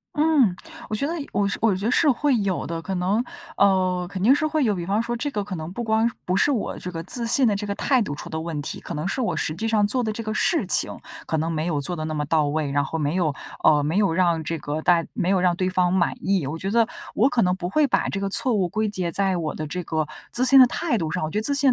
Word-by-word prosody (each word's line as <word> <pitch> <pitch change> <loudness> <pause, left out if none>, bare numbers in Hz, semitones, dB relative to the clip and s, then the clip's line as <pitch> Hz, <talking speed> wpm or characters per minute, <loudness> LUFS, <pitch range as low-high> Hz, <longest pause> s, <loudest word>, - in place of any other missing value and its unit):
嗯， 295 - +3 0.3
我 215 - -2
觉 280 +7 -1
得 330 - -2 0.2
我 200 -1 +1
我 220 -3 +2
觉 195 +3 -4
得 - - +1
是 305 - +3
会 275 +1 +1
有 195 -3 -2
的， 165 0 -4
可 190 - -4
能， 195 +6 0 0.3
呃， 185 -2 +2
肯 190 -1 -6
定 245 +7 +6
是 310 - 0
会 310 -1 0
有， 215 -5 +1
比 175 -2 -4
方 205 +4 +1
说 235 +1 -3
这 290 +4 -3
个 205 -4 -2
可 200 -2 -6
能 160 +1 -6
不 240 - -4
光 220 +1 +2 0.2
不 185 +2 0
是 290 - +3
我 240 -7 -2
这 180 - -6
个 165 -2 -5
自 235 +7 +2
信 245 +2 +4
的 210 - +2
这 205 +1 -3
个 200 - -2
态 260 +4 +1
度 190 -10 -2
出 145 - -8
的 160 - -4
问 160 -2 -4
题， - - -6
可 - - -8
能 155 +4 -3
是 260 - -2
我 180 -9 -1
实 155 0 -2
际 220 +6 -3
上 210 -2 +2
做 250 +3 0
的 220 - -1
这 230 - -5
个 215 -1 -4
事 335 - +1
情 - - +1 0.3
可 160 - -1
能 160 +2 -1
没 155 -1 -2
有 155 -4 -1
做 175 +5 -4
得 155 - -4
那 155 - -3
么 150 -1 -2
到 155 0 +2
位。 150 -1 -1
然 145 0 +1
后 160 +3 -4
没 150 +2 -1
有 165 -6 +1 0.3
呃， 150 -1 +5
没 160 +6 -1
有 200 -5 +2
让 170 -2 +1
这 165 +2 -3
个 150 +2 -4
大 170 -2 +4
没 180 - -1
有 190 -2 +2
让 180 -1 +2
对 185 +1 -1
方 180 -1 +1
满 180 -2 +1
意。 190 -6 0
我 155 +4 -4
觉 195 - -3
得 230 +1 +3 0.3
我 225 - +4
可 245 -3 +1
能 180 -2 +2
不 175 -2 -4
会 295 +10 +2
把 - - +1
这 195 - -3
个 195 - -2
错 250 +5 +1
误 190 -5 +1
归 215 +3 -1
结 185 -4 -3
在 195 0 +2
我 155 -3 -3
的 155 - -4
这 175 +4 -5
个 155 -2 -2 0.2
自 255 +2 +1
信 270 +1 +8
的 255 - +9
态 305 +2 -1
度 165 -7 -2
上， 165 0 -2
我 155 - -3
觉 210 - 0
得 - - -3
自 285 +4 +2
信 275 -1 +4
190 Hz, 325 characters per minute, -23 LUFS, 165-225 Hz, 0.3 s, 的